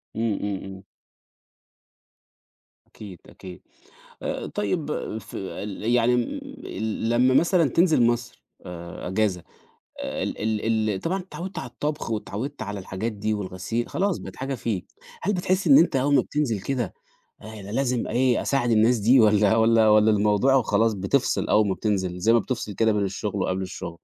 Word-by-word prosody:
إمم، 115 Hz, -1 st, 0 dB
إمم، 100 Hz, -1 st, -2 dB
إمم. 95 Hz, 0 st, -9 dB, 2.0 s
أكيد، 100 Hz, -5 st, -11 dB
أكيد. 90 Hz, -1 st, -11 dB, 0.6 s
آآ -, -, -3 dB
طيب 145 Hz, -, -2 dB, 0.3 s
في 105 Hz, -, -10 dB
ال 100 Hz, +1 st, -6 dB
يعني 125 Hz, 0 st, +3 dB
م -, -, +2 dB, 0.5 s
ال 110 Hz, +1 st, -3 dB
لمّا 125 Hz, +2 st, +3 dB
مثلًا 170 Hz, +1 st, +3 dB
تنزل 165 Hz, -1 st, +3 dB
مصر 120 Hz, 0 st, -1 dB, 0.2 s
آآ 85 Hz, 0 st, -7 dB
أجازة، 95 Hz, -2 st, 0 dB, 0.6 s
ال -, -, -3 dB
ال 110 Hz, 0 st, 0 dB
ال 95 Hz, -, -3 dB
طبعًا 190 Hz, +3 st, -1 dB
اتعوّدت 185 Hz, 0 st, -7 dB
على 125 Hz, -, -7 dB
الطبخ، 150 Hz, 0 st, -4 dB
واتعوّدت 110 Hz, +5 st, -4 dB
على 100 Hz, -1 st, -4 dB
الحاجات 95 Hz, +5 st, -4 dB
دي، 105 Hz, +1 st, -2 dB
والغسيل، 105 Hz, +3 st, -3 dB
خلاص 195 Hz, -1 st, 0 dB
بقت -, -, -9 dB
حاجة 135 Hz, +1 st, -3 dB
فيك. 110 Hz, -7 st, -3 dB, 0.4 s
هل 205 Hz, -, 0 dB
بتحس 185 Hz, +1 st, 0 dB
إن 275 Hz, -, +8 dB
أنت 165 Hz, -, +4 dB
أول 140 Hz, +2 st, +2 dB
ما 130 Hz, -, +5 dB
بتنزل 125 Hz, -9 st, -2 dB
كده 135 Hz, +5 st, -2 dB, 0.5 s
أنا 105 Hz, -2 st, -9 dB
لازم 125 Hz, 0 st, 0 dB
إيه، 125 Hz, 0 st, +2 dB
أساعد 135 Hz, -4 st, 0 dB
الناس 115 Hz, +2 st, +4 dB
دي، 120 Hz, +5 st, +5 dB
والّا 105 Hz, 0 st, +4 dB
والّا 115 Hz, -1 st, +4 dB
والّا 105 Hz, +1 st, +5 dB
الموضوع 105 Hz, +5 st, +3 dB
وخلاص 110 Hz, -3 st, +2 dB
بتفصل 100 Hz, +8 st, 0 dB
أول 105 Hz, -1 st, +3 dB
ما 95 Hz, -, 0 dB
بتنزل، 95 Hz, -4 st, -2 dB
زي 110 Hz, +6 st, +3 dB
ما 120 Hz, -, +5 dB
بتفصل 115 Hz, -2 st, -3 dB
كده 110 Hz, +2 st, +2 dB
بين 105 Hz, -1 st, 0 dB
الشغل، 100 Hz, +1 st, -3 dB
وقبل 95 Hz, +1 st, -1 dB
الشغل؟ 95 Hz, -, -6 dB
110 Hz, 160 wpm, -24 LUFS, 100-130 Hz, 2.0 s, إن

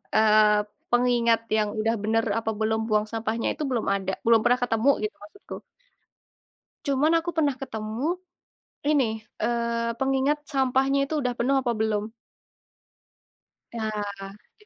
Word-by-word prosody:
eee, 215 Hz, -1 st, +5 dB, 0.3 s
pengingat 240 Hz, -1 st, +3 dB, 0.2 s
yang 210 Hz, -1 st, +1 dB
udah 225 Hz, +1 st, +1 dB
bener 225 Hz, +1 st, +1 dB, 0.2 s
apa 225 Hz, -1 st, -2 dB
belum 220 Hz, 0 st, +1 dB
buang 210 Hz, 0 st, +2 dB
sampahnya 225 Hz, 0 st, -2 dB
itu -, -, -5 dB
belum 245 Hz, -4 st, -1 dB
ada 190 Hz, -1 st, -2 dB
belum 230 Hz, 0 st, +6 dB
pernah 245 Hz, +1 st, +3 dB
ketemu 230 Hz, +2 st, +2 dB
gitu 215 Hz, -, -3 dB
maksudku. 210 Hz, -, -11 dB, 1.3 s
Cuman 295 Hz, +4 st, +3 dB
aku 330 Hz, +1 st, -2 dB
pernah 295 Hz, -5 st, +1 dB
ketemu 250 Hz, +7 st, -3 dB, 0.7 s
ini, 240 Hz, -7 st, +1 dB, 0.2 s
eee, 235 Hz, 0 st, 0 dB
pengingat 270 Hz, +3 st, +1 dB
sampahnya 270 Hz, 0 st, +2 dB
itu 310 Hz, -1 st, -1 dB
udah 250 Hz, -2 st, -1 dB
penuh 270 Hz, +3 st, +1 dB
apa 245 Hz, -2 st, 0 dB
belum. 215 Hz, 0 st, -1 dB, 1.6 s
Ya, 220 Hz, -2 st, -2 dB, 0.3 s
jadi 195 Hz, -, -13 dB
235 Hz, 130 wpm, -25 LUFS, 220-270 Hz, 1.6 s, belum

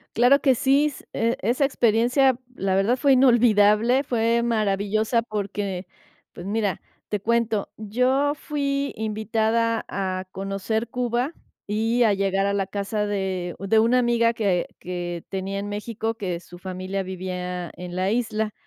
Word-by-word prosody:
Claro 250 Hz, +5 st, +5 dB
que 270 Hz, -, +4 dB
sí 270 Hz, +4 st, +3 dB
s 295 Hz, -3 st, -5 dB
eh, 230 Hz, +1 st, 0 dB
esa 245 Hz, +6 st, +2 dB
experiencia 245 Hz, +1 st, +3 dB, 0.2 s
la 190 Hz, -1 st, 0 dB
verdad 210 Hz, +7 st, +2 dB
fue 275 Hz, 0 st, +4 dB
inolvidable, 240 Hz, -1 st, +4 dB
fue 235 Hz, -2 st, +1 dB
maravillosa 215 Hz, 0 st, +1 dB
porque, 200 Hz, -3 st, -4 dB, 0.5 s
pues 175 Hz, -, -9 dB
mira, 205 Hz, -2 st, -1 dB, 0.3 s
te 210 Hz, -, -1 dB
cuento, 225 Hz, 0 st, 0 dB
yo 250 Hz, +7 st, +1 dB
fui 280 Hz, -1 st, -2 dB
invitada 220 Hz, +1 st, 0 dB
a 185 Hz, -1 st, -3 dB
conocer 195 Hz, +4 st, -2 dB
Cuba 245 Hz, +4 st, -1 dB, 0.3 s
y 225 Hz, +4 st, +1 dB
a 215 Hz, -3 st, +4 dB
llegar 195 Hz, 0 st, +1 dB
a 200 Hz, -, +1 dB
la 195 Hz, -1 st, 0 dB
casa 205 Hz, +1 st, -2 dB
de 190 Hz, -3 st, -2 dB
de 200 Hz, +3 st, +2 dB
una 230 Hz, +3 st, +4 dB
amiga 235 Hz, -1 st, +3 dB
que 195 Hz, -6 st, 0 dB
que 175 Hz, -1 st, -5 dB
tenía 195 Hz, +1 st, -3 dB
en 200 Hz, +1 st, -4 dB
México 220 Hz, +2 st, -3 dB
que 185 Hz, -6 st, -4 dB
su 175 Hz, 0 st, -14 dB
familia 185 Hz, +1 st, -4 dB
vivía 180 Hz, -1 st, -5 dB
en 180 Hz, 0 st, -7 dB
la 185 Hz, +2 st, 0 dB
isla. 220 Hz, -2 st, -1 dB
215 Hz, 150 wpm, -24 LUFS, 195-235 Hz, 0.5 s, Claro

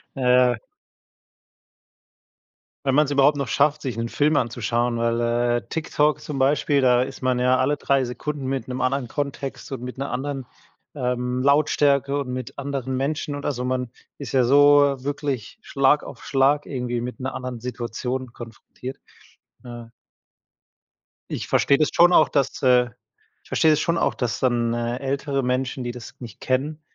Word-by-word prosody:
Ja. 125 Hz, -2 st, +3 dB, 2.3 s
Wenn 135 Hz, 0 st, +2 dB
man 150 Hz, +1 st, +5 dB
es 140 Hz, -, -5 dB
überhaupt 145 Hz, +1 st, +4 dB
noch 140 Hz, -3 st, -2 dB
schafft, 145 Hz, +4 st, +2 dB
sich 125 Hz, -5 st, -4 dB
'nen 115 Hz, 0 st, -2 dB
Film 150 Hz, +1 st, +2 dB
anzuschauen, 120 Hz, 0 st, 0 dB
weil, 115 Hz, 0 st, 0 dB
äh, 120 Hz, 0 st, +1 dB
TikTok 150 Hz, -2 st, 0 dB
zum 140 Hz, -3 st, -5 dB
Beispiel 140 Hz, +1 st, +2 dB
da 125 Hz, -1 st, +4 dB
ist 130 Hz, -, -5 dB
man 130 Hz, -1 st, +1 dB
ja 125 Hz, +1 st, +3 dB
alle 135 Hz, +3 st, +1 dB
3 135 Hz, -2 st, +1 dB
Sekunden 140 Hz, +3 st, -5 dB
mit 130 Hz, -3 st, -3 dB
'nem 130 Hz, 0 st, -4 dB
anderen 130 Hz, -1 st, 0 dB
Kontext 140 Hz, +1 st, -5 dB
und 130 Hz, -3 st, -5 dB
mit 125 Hz, +1 st, -7 dB
'ner 135 Hz, -2 st, -4 dB
anderen, 135 Hz, 0 st, -3 dB, 0.5 s
ähm, 125 Hz, -1 st, -1 dB
Lautstärke 140 Hz, 0 st, +2 dB
und 125 Hz, -3 st, -4 dB
mit 130 Hz, 0 st, -6 dB
anderen 135 Hz, -2 st, -3 dB
Menschen 145 Hz, +2 st, -2 dB
und 145 Hz, -, -7 dB
also, 125 Hz, -3 st, -2 dB
man 125 Hz, -1 st, -2 dB, 0.3 s
ist 135 Hz, -6 st, -6 dB
ja 130 Hz, -2 st, +3 dB
so 145 Hz, +1 st, +5 dB
wirklich 140 Hz, -, -4 dB
Schlag 140 Hz, +2 st, +2 dB
auf -, -, -10 dB
Schlag 140 Hz, +2 st, +2 dB
irgendwie 125 Hz, -3 st, -3 dB
mit 125 Hz, +3 st, -6 dB
'ner 130 Hz, +1 st, -4 dB
anderen 125 Hz, -2 st, -5 dB
Situation 125 Hz, +1 st, -4 dB
konfrontiert. 120 Hz, +3 st, -9 dB, 0.7 s
Ja. 120 Hz, -2 st, -9 dB, 1.4 s
Ich -, -, -4 dB
verstehe 140 Hz, -, +3 dB
das 155 Hz, -, +2 dB
schon 175 Hz, +1 st, +6 dB
auch, -, -, +5 dB
dass, 140 Hz, -3 st, -1 dB
äh 125 Hz, -1 st, +5 dB, 0.6 s
ich -, -, -22 dB
verstehe 160 Hz, -, +3 dB
das 155 Hz, -, +3 dB
schon 170 Hz, -1 st, 0 dB
auch, -, -, +1 dB
dass 120 Hz, -3 st, -2 dB
dann, 120 Hz, -2 st, +1 dB
äh, 120 Hz, +1 st, -2 dB
ältere 135 Hz, 0 st, -2 dB
Menschen, 130 Hz, 0 st, -1 dB
die 120 Hz, -, -3 dB
das 120 Hz, -2 st, -10 dB
nicht 115 Hz, -6 st, -10 dB
kennen, 145 Hz, +4 st, -1 dB
130 Hz, 165 wpm, -23 LUFS, 125-140 Hz, 2.3 s, schon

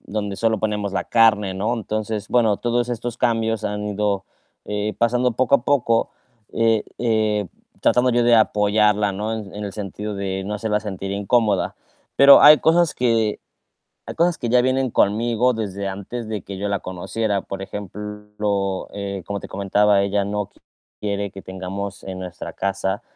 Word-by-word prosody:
donde 100 Hz, -1 st, -4 dB
solo 110 Hz, -1 st, +1 dB
ponemos 105 Hz, -2 st, -2 dB
la 100 Hz, -, -1 dB
carne, 105 Hz, -4 st, +3 dB
¿no? 105 Hz, +5 st, -1 dB
Entonces, 110 Hz, -1 st, -4 dB
bueno, 110 Hz, -4 st, +2 dB
todos 120 Hz, 0 st, 0 dB
estos 120 Hz, 0 st, -4 dB
cambios 115 Hz, -2 st, 0 dB
han 105 Hz, 0 st, -3 dB
ido, 100 Hz, -2 st, -1 dB, 0.4 s
eh, 105 Hz, +1 st, -2 dB
pasando 125 Hz, +1 st, +2 dB
poco 130 Hz, +4 st, +2 dB
a -, -, -8 dB
poco, 120 Hz, -5 st, +2 dB, 0.4 s
eh 115 Hz, -2 st, +2 dB
eh, 110 Hz, -3 st, +1 dB, 0.3 s
tratando 125 Hz, +1 st, +3 dB
yo 120 Hz, 0 st, +2 dB
de 120 Hz, 0 st, +5 dB
apoyarla, 105 Hz, -1 st, +3 dB
¿no? 105 Hz, +3 st, -3 dB
En 105 Hz, -3 st, -7 dB
en 105 Hz, 0 st, -5 dB
el 100 Hz, -, -5 dB
sentido 105 Hz, +1 st, -5 dB
de 95 Hz, -1 st, -3 dB
no 105 Hz, +2 st, -3 dB
hacerla 105 Hz, 0 st, -1 dB
sentir 95 Hz, -2 st, -5 dB
incómoda. 100 Hz, 0 st, +1 dB, 0.4 s
Pero 140 Hz, 0 st, +9 dB
hay 150 Hz, +1 st, +9 dB
cosas 170 Hz, 0 st, +3 dB
que 115 Hz, -3 st, +1 dB, 0.7 s
hay -, -, -6 dB
cosas 170 Hz, 0 st, +2 dB
que 120 Hz, -, -3 dB
ya 125 Hz, +1 st, +5 dB
vienen 130 Hz, 0 st, +1 dB
conmigo 115 Hz, +5 st, +2 dB
desde 100 Hz, -3 st, -4 dB
antes 100 Hz, +4 st, -6 dB
de 105 Hz, -3 st, -3 dB
que 100 Hz, -, -7 dB
yo 100 Hz, +2 st, -2 dB
la 100 Hz, -1 st, 0 dB
conociera. 100 Hz, +3 st, -2 dB
Por 95 Hz, 0 st, -6 dB
ejemplo, 105 Hz, 0 st, -4 dB
eh, 100 Hz, -2 st, -5 dB
como 100 Hz, -1 st, -4 dB
te -, -, -9 dB
comentaba, 100 Hz, +1 st, +2 dB
ella 100 Hz, 0 st, 0 dB
no 105 Hz, 0 st, -3 dB, 0.5 s
quiere 100 Hz, -1 st, -3 dB
que 95 Hz, -, -10 dB
tengamos 95 Hz, +1 st, -6 dB
en 95 Hz, -1 st, -6 dB
nuestra 90 Hz, -2 st, -7 dB
casa 95 Hz, 0 st, -2 dB
105 Hz, 170 wpm, -21 LUFS, 100-115 Hz, 0.7 s, Pero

